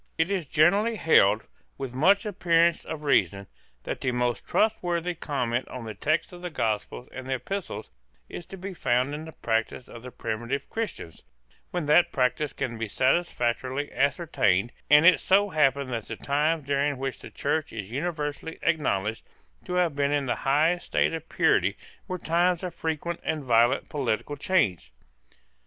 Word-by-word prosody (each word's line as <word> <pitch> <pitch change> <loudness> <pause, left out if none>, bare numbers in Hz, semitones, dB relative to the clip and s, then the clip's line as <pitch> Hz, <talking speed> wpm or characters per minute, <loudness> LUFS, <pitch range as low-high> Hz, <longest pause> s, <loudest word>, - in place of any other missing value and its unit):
It 160 +4 +1
is 185 -7 -1
generally 195 - +3
held, 110 - +4 0.3
with 135 -3 -5
much 195 - +4
appearance 170 -4 +2
of 155 -1 -6
reason, 100 - +2 0.4
that - - -5
the 130 - 0
most 125 0 -1
trustworthy 180 -5 +1
comment 125 -6 -2
on 125 -2 -7
the 110 - -5
text 155 - -1
of 175 - -10
the 180 - -4
Gospels 115 -3 -2
and 130 0 -7
Epistles 165 - -4 0.4
is 175 - -8
to 195 - -9
be 190 +1 -6
found 130 -3 0
in 155 +2 -5
the 160 - -9
practice 115 -1 -2
of 115 - -11
the 125 - -8
primitive 120 +4 -4
Christians, 220 - -5 0.5
when 175 -3 -3
that 150 +4 +4
practice 130 +3 0
can 115 -3 -4
be 115 - -2
satisfactorily 130 0 0
ascertained; 120 - +1 0.2
and 150 +2 +7
it 180 -1 +7
so 200 +2 +3
happened 140 -5 +1
that 115 -2 -4
the 110 - -5
times 150 +5 0
during 140 0 0
which 135 0 -4
the - - -10
Church 145 +2 -2
is 105 -1 -7
universally 150 +2 -3
acknowledged 110 - 0 0.4
to - - -5
have 175 -3 +2
been 140 0 0
in 145 -1 +1
the 125 - -1
highest 160 +5 +2
state - - +1
of 165 0 -6
purity - - +2 0.3
were 185 -2 -3
times 175 +1 +1
of 180 -2 -4
frequent 165 +1 -3
and 155 -2 -2
violent 120 +1 +3
political 140 0 -2
change. 110 - 0
145 Hz, 165 wpm, -26 LUFS, 125-170 Hz, 0.5 s, and